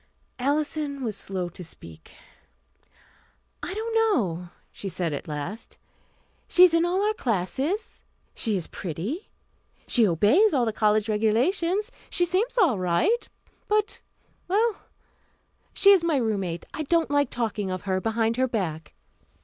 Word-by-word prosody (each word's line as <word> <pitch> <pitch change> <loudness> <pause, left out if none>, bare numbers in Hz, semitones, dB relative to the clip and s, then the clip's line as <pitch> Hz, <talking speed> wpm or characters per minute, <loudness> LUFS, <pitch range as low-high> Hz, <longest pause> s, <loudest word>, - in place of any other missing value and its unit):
Alison 285 +1 -1
was 220 -4 -2
slow 190 -3 -4
to 180 +2 -10
speak. 80 - -11 1.5
"I - - -5
don't 445 +3 -3
know," 200 - +1 0.2
she 195 - -6
said 175 -4 -2
at 145 - -5
last. 155 +9 -6 0.7
"She 360 - +6
is 360 -2 +7
in 335 0 +3
all 370 +3 +1
our 430 - +2
classes; 265 - -2 0.3
she 215 -3 +1
is 175 - -3
pretty; 195 - -5 0.6
she 235 -4 +4
obeys 270 - +4
all 250 -3 +2
the 220 - -1
college 215 0 +2
regulations. 335 - +1 0.2
She 350 - +2
seems 395 +9 0
all 320 - +3
right; 185 - +1 0.4
but 425 +1 0 0.5
well, 425 +3 0 0.8
she 400 0 +6
is 380 -4 +5
my 335 -3 +1
roommate, 200 -9 -1
I - - -4
don't 325 +1 +1
like 285 -3 +2
talking 220 -4 -2
of 185 -1 -4
her 190 -1 -1
behind 225 +1 0
her 260 0 +2
back." 170 - -4
240 Hz, 140 wpm, -25 LUFS, -, 1.5 s, is